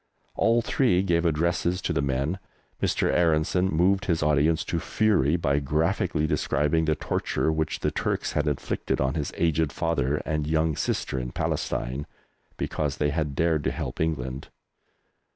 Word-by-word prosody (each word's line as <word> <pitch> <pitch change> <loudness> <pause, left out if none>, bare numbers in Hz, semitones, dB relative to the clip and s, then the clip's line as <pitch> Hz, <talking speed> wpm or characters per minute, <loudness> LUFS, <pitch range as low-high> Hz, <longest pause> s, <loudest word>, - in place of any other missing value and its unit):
All 115 +1 +2
three 115 -8 +2
gave 85 -2 +2
addresses 85 +3 0
to - - 0
the - - +1
men. 70 +6 -1 0.4
Mr. - - +1
Aaronson 85 +2 +2
moved 95 +4 +2
his 80 -3 0
audience 75 +2 +2
to 85 - -1
fury 90 -7 +2
by 70 -4 +1
graphically 80 +3 0
describing 75 +1 +1
the 80 0 +2
torture 80 - -1
which 80 0 -2
the - - +1
Turks - - -1
had 75 +1 0
inflicted 75 -3 -2
on 65 0 +1
his 75 -3 -2
aged 80 -2 +1
father 75 -5 0
and 75 -1 -1
young 80 0 +1
sister 65 - -1
in 60 -1 -5
Palestine, 65 +4 -2 0.5
because 75 -2 -2
they 75 -1 +1
had 75 -2 -2
dared 80 -2 +1
to - - +2
help - - -4
England. 70 -4 -2
80 Hz, 155 wpm, -26 LUFS, 75-85 Hz, 0.5 s, All